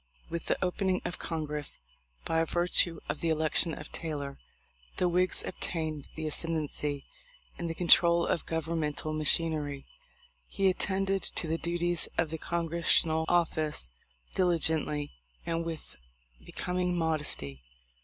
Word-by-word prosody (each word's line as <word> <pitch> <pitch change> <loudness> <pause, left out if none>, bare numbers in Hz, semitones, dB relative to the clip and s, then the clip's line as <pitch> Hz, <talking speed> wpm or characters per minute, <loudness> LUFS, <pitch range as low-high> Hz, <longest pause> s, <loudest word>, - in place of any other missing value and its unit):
With 170 -1 -4
the - - +2
opening 185 +1 0
of 175 - -4
Congress, 150 -3 -2 0.5
by 165 0 +2
virtue 175 -1 +2
of - - -2
the 165 - 0
election 160 +1 +2
of - - -8
Taylor, 145 -4 -4 0.6
the 180 - +3
Whigs 180 +1 +4
obtained 155 -4 -4
the 155 - -4
ascendency 150 -2 -1 0.5
in 170 - -2
the 165 - -3
control 170 0 +6
of 165 - -1
governmental 160 -2 -1
machin 155 +2 +2
ery. 145 -3 -4 0.6
He 195 -1 +3
attended 195 +1 0
to 170 - -3
the 165 +1 0
duties 175 0 0
of 160 -2 +1
the 160 - -4
Congres 170 0 -2
sional 160 0 +4
office 155 - +1 0.4
diligently 160 -4 +1 0.3
and 165 0 0
with 165 -1 -6 0.5
becoming 180 0 -1
modesty. 150 - -1
165 Hz, 130 wpm, -30 LUFS, 155-175 Hz, 0.6 s, control